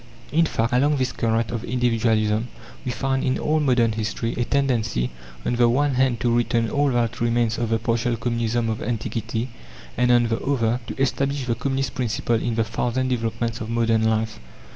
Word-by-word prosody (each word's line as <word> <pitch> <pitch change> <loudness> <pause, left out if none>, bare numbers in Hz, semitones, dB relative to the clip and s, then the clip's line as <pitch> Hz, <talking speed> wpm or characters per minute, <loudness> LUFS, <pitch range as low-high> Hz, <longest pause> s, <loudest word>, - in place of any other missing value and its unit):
In 165 +2 +3
fact, 115 -3 -1
along 145 +4 +3
this 130 -1 0
current 115 0 0
of 115 -1 -3
Individualism, 115 -2 +1 0.4
we 125 - -2
find 135 +1 -1
in 130 -2 +1
all 155 +1 +1
modern 125 -6 +3
history 110 +1 -2
a 120 - -1
tendency, 115 - 0 0.3
on 120 - 0
the 120 -1 +5
one 140 +3 +2
hand 130 -2 +2
to 120 -2 +2
retain 115 -1 +1
all 145 0 +2
that 120 -3 0
remains 120 -1 +1
of 120 -2 -1
the 115 - +2
partial 115 +1 0
Communism 115 0 0
of 110 -1 -2
antiquity, 115 +1 -3 0.5
and, 125 0 +3
on 120 -1 +5
the 115 - -1
other, 120 -4 +1
to - - -6
establish 135 0 0
the 120 - 0
Communist 135 +3 -2
principle 120 -1 0
in 120 -2 -1
the 115 - +2
thousand 120 +3 -1
developments 115 -1 -2
of 110 - -4
modern 115 -1 +2
life. 110 0 0
120 Hz, 185 wpm, -23 LUFS, 115-130 Hz, 0.5 s, the